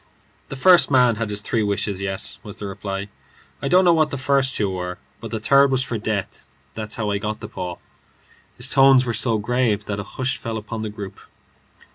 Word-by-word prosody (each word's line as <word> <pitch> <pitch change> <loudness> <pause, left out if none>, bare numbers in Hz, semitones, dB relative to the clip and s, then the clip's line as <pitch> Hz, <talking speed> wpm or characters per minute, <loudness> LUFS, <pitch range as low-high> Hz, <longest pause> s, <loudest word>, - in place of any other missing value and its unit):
"The - - -5
first 180 +6 +6
man 125 -4 +4
had 115 -1 -2
his 105 0 0
three 110 +1 0
wishes. 100 -1 -2
Yes," 95 -1 -3
was 105 -4 -9
the 105 - -5
reply; 100 0 -5 0.5
"I - - -2
don't 185 +1 +4
know 175 - +6
what 155 -2 +2
the 140 - -4
first 135 0 +1
two 100 -2 0
were, 90 -1 -4 0.2
but 115 +1 -7
the 110 - -3
third 140 +5 +5
was 130 -1 +1
for 120 -4 -4
death. 105 -2 -3 0.3
That's 110 -1 -5
how 105 -2 -2
I 100 - -1
got 105 +1 -4
the 105 - -7
paw." 90 -5 -6 0.8
His - - -3
tones 135 -1 +6
were 120 - -2
so 110 +1 +1
grave 110 -1 0
that 100 -1 -4
a - - -3
hush 130 +5 -3
fell 115 -1 -4
upon 110 +1 -6
the 110 - -3
group. 100 -2 -8
110 Hz, 215 wpm, -22 LUFS, 100-130 Hz, 0.8 s, first